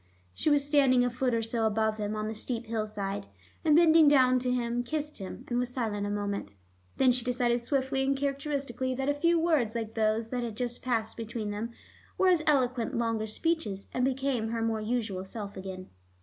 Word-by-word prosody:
She 305 Hz, -, 0 dB
was 290 Hz, -1 st, +3 dB
standing 270 Hz, -4 st, +4 dB
a 245 Hz, -, 0 dB
foot 250 Hz, +1 st, 0 dB
or 225 Hz, -, 0 dB
so 225 Hz, 0 st, 0 dB
above 220 Hz, 0 st, 0 dB
him, 210 Hz, 0 st, -2 dB
on 215 Hz, 0 st, -2 dB
the 220 Hz, -, -3 dB
steep 230 Hz, +2 st, -3 dB
hillside, 210 Hz, -, -3 dB, 0.4 s
and 305 Hz, -2 st, +4 dB
bending 325 Hz, -1 st, +7 dB
down 255 Hz, -3 st, +5 dB
to 250 Hz, 0 st, -2 dB
him, 240 Hz, -1 st, 0 dB
kissed 300 Hz, +3 st, -3 dB
him, 190 Hz, -, -7 dB
and 240 Hz, 0 st, 0 dB
was 250 Hz, 0 st, -1 dB
silent 215 Hz, -5 st, -2 dB
a -, -, -3 dB
moment. 205 Hz, -, -3 dB, 0.4 s
Then 260 Hz, -1 st, +5 dB
she 245 Hz, -1 st, +1 dB
decided 245 Hz, -1 st, +1 dB
swiftly 265 Hz, +1 st, 0 dB
and 275 Hz, 0 st, +1 dB
characteristically 275 Hz, -2 st, -2 dB
that 270 Hz, +2 st, -1 dB
a -, -, +3 dB
few 335 Hz, +4 st, +2 dB
words 300 Hz, -10 st, +1 dB
like 225 Hz, -1 st, -3 dB
those 220 Hz, 0 st, 0 dB
that 250 Hz, 0 st, -2 dB
had 230 Hz, -3 st, -5 dB
just 245 Hz, -1 st, -3 dB
passed 230 Hz, -3 st, -1 dB
between 225 Hz, -2 st, -4 dB
them 210 Hz, +3 st, -3 dB, 0.5 s
were 380 Hz, -, +4 dB
as 350 Hz, -3 st, +4 dB
eloquent 255 Hz, -5 st, +2 dB
as -, -, 0 dB
longer 225 Hz, -2 st, 0 dB
speeches, 215 Hz, -, -2 dB
and 250 Hz, -, 0 dB
became 265 Hz, -3 st, 0 dB
her 225 Hz, 0 st, -2 dB
more 225 Hz, -1 st, 0 dB
usual 215 Hz, -4 st, -2 dB
self 200 Hz, +1 st, -7 dB
again. 190 Hz, -1 st, -7 dB
240 Hz, 205 wpm, -29 LUFS, 220-270 Hz, 0.5 s, bending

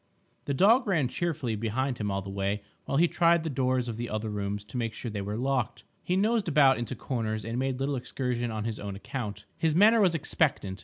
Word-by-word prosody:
The 140 Hz, -, -1 dB
dog 225 Hz, -, +5 dB
ran 155 Hz, -10 st, +2 dB
cheerfully 155 Hz, -10 st, -2 dB
behind 120 Hz, +4 st, -1 dB
him 105 Hz, -1 st, -1 dB
all 100 Hz, -1 st, -2 dB
the 95 Hz, -, -7 dB
way 100 Hz, +1 st, -2 dB, 0.2 s
while 135 Hz, -, -1 dB
he 170 Hz, +3 st, +5 dB
tried 170 Hz, -1 st, +3 dB
the 160 Hz, -, -2 dB
doors 130 Hz, -1 st, 0 dB
of 115 Hz, -2 st, -4 dB
the 120 Hz, 0 st, -4 dB
other 110 Hz, 0 st, -3 dB
rooms 100 Hz, 0 st, -3 dB
to 125 Hz, -, -7 dB
make 115 Hz, -2 st, -2 dB
sure 120 Hz, -, -5 dB
they 105 Hz, -1 st, -3 dB
were 105 Hz, +2 st, -3 dB
locked. 125 Hz, -2 st, -1 dB, 0.2 s
He 180 Hz, -, 0 dB
nosed 215 Hz, 0 st, +2 dB
about 140 Hz, -5 st, +5 dB
into 120 Hz, -3 st, -3 dB
corners 110 Hz, -4 st, -3 dB
and 115 Hz, +2 st, -2 dB
made 130 Hz, -1 st, -1 dB
little 140 Hz, +1 st, 0 dB
excursions 125 Hz, -1 st, -2 dB
on 110 Hz, -1 st, -3 dB
his 110 Hz, -1 st, -3 dB
own 100 Hz, -1 st, -5 dB
account. 105 Hz, -1 st, -5 dB
His 160 Hz, -2 st, +2 dB
manner 220 Hz, +5 st, +6 dB
was 180 Hz, -4 st, +4 dB
expectant. 140 Hz, -10 st, 0 dB
125 Hz, 225 wpm, -28 LUFS, 110-155 Hz, 0.2 s, manner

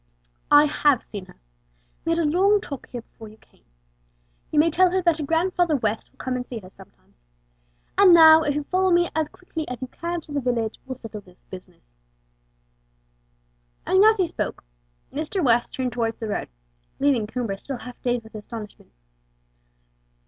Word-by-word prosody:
"I 295 Hz, 0 st, +7 dB
have 290 Hz, -3 st, +2 dB
seen 200 Hz, -3 st, -8 dB
her. -, -, -16 dB, 0.7 s
We 330 Hz, -, +2 dB
had -, -, -1 dB
a 335 Hz, -, +1 dB
long 385 Hz, +7 st, +3 dB
talk 280 Hz, -, -8 dB
here 240 Hz, -2 st, -7 dB
before 225 Hz, -1 st, -14 dB
you 215 Hz, -, -17 dB
came. -, -, -29 dB, 0.9 s
You -, -, -3 dB
may 320 Hz, +2 st, +5 dB
tell 365 Hz, +3 st, +4 dB
her 375 Hz, +1 st, +1 dB
that 335 Hz, -2 st, +3 dB
her 310 Hz, -, -4 dB
Grandfather 330 Hz, +1 st, +1 dB
West 220 Hz, -4 st, -2 dB
will -, -, -34 dB
come 260 Hz, -1 st, -3 dB
and 250 Hz, -, -2 dB
see 245 Hz, -, -6 dB
her 185 Hz, -4 st, -11 dB
sometimes. -, -, -20 dB, 0.8 s
And 395 Hz, -2 st, +8 dB
now, 320 Hz, -1 st, +9 dB
if 290 Hz, -2 st, -1 dB
you'll 295 Hz, -, -1 dB
follow 370 Hz, +5 st, +1 dB
me 345 Hz, -1 st, +3 dB
as 315 Hz, -1 st, 0 dB
quickly 325 Hz, -3 st, -7 dB
as 250 Hz, -, -6 dB
you 260 Hz, -, -4 dB
can 340 Hz, +4 st, -4 dB
to 305 Hz, -, -15 dB
the 285 Hz, -1 st, -1 dB
village, 235 Hz, -3 st, -1 dB
we'll 260 Hz, -, -4 dB
settle 225 Hz, -4 st, -9 dB
this 180 Hz, -2 st, -16 dB
business;" 185 Hz, -, -12 dB, 2.0 s
and 375 Hz, +1 st, +4 dB
as 440 Hz, +1 st, +6 dB
he 375 Hz, -, +2 dB
spoke, 330 Hz, -, -4 dB, 0.5 s
Mr. 315 Hz, +5 st, -2 dB
West 235 Hz, -1 st, +2 dB
turned 255 Hz, -1 st, -2 dB
towards 230 Hz, -1 st, -1 dB
the 225 Hz, -, -5 dB
road, -, -, -3 dB, 0.5 s
leaving 270 Hz, -6 st, +2 dB
Coomber 225 Hz, -3 st, -3 dB
still 270 Hz, +2 st, -6 dB
half 250 Hz, 0 st, -11 dB
dazed 245 Hz, -1 st, -1 dB
with 220 Hz, -, -16 dB
astonishment. 215 Hz, 0 st, -9 dB
280 Hz, 185 wpm, -24 LUFS, 230-330 Hz, 2.0 s, now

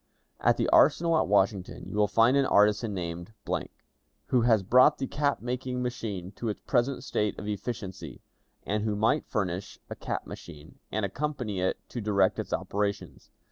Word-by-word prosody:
"At -, -, +3 dB
the -, -, +1 dB
arsenal 165 Hz, +3 st, +5 dB
at -, -, +2 dB
Washington 100 Hz, -1 st, +1 dB
you -, -, -7 dB
will 105 Hz, 0 st, +4 dB
find 115 Hz, +6 st, +4 dB
an 140 Hz, -1 st, +3 dB
artisan 105 Hz, +2 st, +3 dB
named, 85 Hz, +2 st, -5 dB, 1.0 s
who 125 Hz, -, +3 dB
has 115 Hz, -4 st, +3 dB
brought 130 Hz, +9 st, +5 dB
the 135 Hz, -, -2 dB
cap 145 Hz, +1 st, -1 dB
making 125 Hz, +1 st, -3 dB
machine 105 Hz, -7 st, -4 dB
to 115 Hz, -, -2 dB
its 105 Hz, -, -4 dB
present 125 Hz, +3 st, 0 dB
state 105 Hz, -1 st, -1 dB
of 105 Hz, -, -6 dB
efficiency, 95 Hz, -, -5 dB, 0.4 s
and 105 Hz, +1 st, -1 dB
who 110 Hz, -1 st, 0 dB
might 115 Hz, +9 st, +1 dB
furnish 95 Hz, -2 st, -3 dB
a -, -, -3 dB
cap -, -, -4 dB
machine, 75 Hz, 0 st, -11 dB
and 110 Hz, -2 st, 0 dB
accompany 125 Hz, -2 st, -3 dB
it 95 Hz, -, 0 dB
to 120 Hz, -, -5 dB
direct 100 Hz, -3 st, +2 dB
its -, -, -5 dB
operations. 100 Hz, 0 st, -3 dB
105 Hz, 170 wpm, -28 LUFS, 100-125 Hz, 1.0 s, arsenal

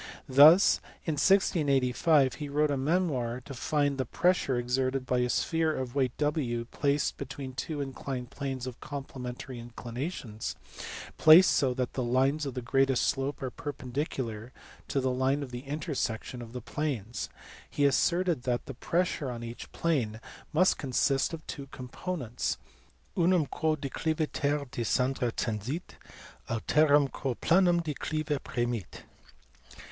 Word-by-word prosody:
Thus, 150 Hz, +8 st, +8 dB, 0.3 s
in 160 Hz, -, 0 dB
1685, 145 Hz, -4 st, +3 dB
he 145 Hz, -1 st, -6 dB
wrote 150 Hz, +1 st, +2 dB
a -, -, +1 dB
memoir 135 Hz, -5 st, 0 dB
to 135 Hz, +3 st, -9 dB
find 145 Hz, +1 st, 0 dB
the 130 Hz, -, +1 dB
pressure 175 Hz, -2 st, +1 dB
exerted 130 Hz, +2 st, 0 dB
by 125 Hz, -1 st, +1 dB
a 125 Hz, 0 st, +1 dB
sphere 160 Hz, +3 st, +1 dB
of 130 Hz, -2 st, -4 dB
weight 130 Hz, -3 st, 0 dB
W 145 Hz, -6 st, 0 dB
placed 140 Hz, 0 st, 0 dB
between 135 Hz, 0 st, -6 dB
two 150 Hz, +2 st, -3 dB
inclined 135 Hz, -2 st, -5 dB
planes 135 Hz, -3 st, -4 dB
of 130 Hz, -2 st, -7 dB
complementary 130 Hz, -3 st, -6 dB
inclinations, 120 Hz, 0 st, -5 dB, 0.6 s
placed 160 Hz, +4 st, +9 dB
so 130 Hz, -3 st, +2 dB
that 125 Hz, -1 st, -2 dB
the 130 Hz, -, -2 dB
lines 135 Hz, +5 st, +1 dB
of 125 Hz, -2 st, -5 dB
greatest 135 Hz, 0 st, +2 dB
slope 135 Hz, 0 st, -1 dB
are 130 Hz, -, -2 dB
perpendicular 125 Hz, -5 st, -4 dB, 0.4 s
to 140 Hz, -, 0 dB
the 130 Hz, 0 st, +1 dB
line 130 Hz, +3 st, +1 dB
of 130 Hz, -, -8 dB
the 125 Hz, +2 st, -7 dB
intersection 140 Hz, -5 st, -3 dB
of 115 Hz, -1 st, -9 dB
the 125 Hz, -, -5 dB
planes. 125 Hz, -5 st, -3 dB, 0.4 s
He 145 Hz, -, +1 dB
asserted 170 Hz, +2 st, +2 dB
that 125 Hz, -1 st, -1 dB
the 135 Hz, -, -6 dB
pressure 165 Hz, 0 st, -1 dB
on 120 Hz, -1 st, -5 dB
each 115 Hz, 0 st, -8 dB
plane 125 Hz, -10 st, 0 dB, 0.3 s
must 185 Hz, +5 st, +3 dB
consist 135 Hz, 0 st, +1 dB
of 165 Hz, -1 st, -7 dB
two 140 Hz, -3 st, -7 dB
components, 130 Hz, 0 st, -4 dB, 0.3 s
" 60 Hz, +3 st, -35 dB
unum 175 Hz, -2 st, +3 dB
quo 155 Hz, +3 st, 0 dB
decliviter 150 Hz, 0 st, -1 dB
de -, -, -4 dB
scendere 125 Hz, +1 st, +1 dB
tendit, 115 Hz, -, -3 dB, 0.6 s
alterum 145 Hz, +4 st, +3 dB
quo 130 Hz, -4 st, -3 dB
planum 175 Hz, +2 st, +3 dB
declive 155 Hz, -1 st, -2 dB
premit." 120 Hz, -5 st, -3 dB
135 Hz, 140 wpm, -29 LUFS, 125-150 Hz, 0.6 s, placed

